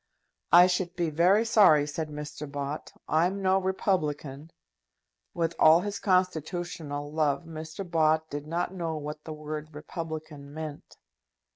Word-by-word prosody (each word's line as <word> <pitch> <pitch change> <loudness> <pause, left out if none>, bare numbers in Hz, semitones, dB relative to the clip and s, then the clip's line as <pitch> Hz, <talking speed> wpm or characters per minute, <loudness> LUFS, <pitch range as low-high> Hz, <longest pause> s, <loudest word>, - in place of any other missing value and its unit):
"I 175 +1 +9
should 180 -1 -1
be 170 -3 -1
very 185 +8 +4
sorry," 195 -10 +6
said 155 +1 -4
Mr. 150 -1 -7
Bott; 145 +1 -5 0.2
"I'm 175 +5 +1
no 190 0 +4
republican." 155 -6 -2 0.9
With 165 0 0
all 160 +2 +7
his 205 0 -4
constitutional 175 -5 -1
love, 155 +1 +1
Mr. 160 +3 -7
Bott 160 -1 +2
did 145 0 -6
not 170 +3 -2
know 165 -4 -3
what 150 0 -6
the 160 - -5
word 155 0 -7
republican 155 -2 -7
meant. 155 -2 -8
160 Hz, 135 wpm, -28 LUFS, 150-175 Hz, 0.9 s, I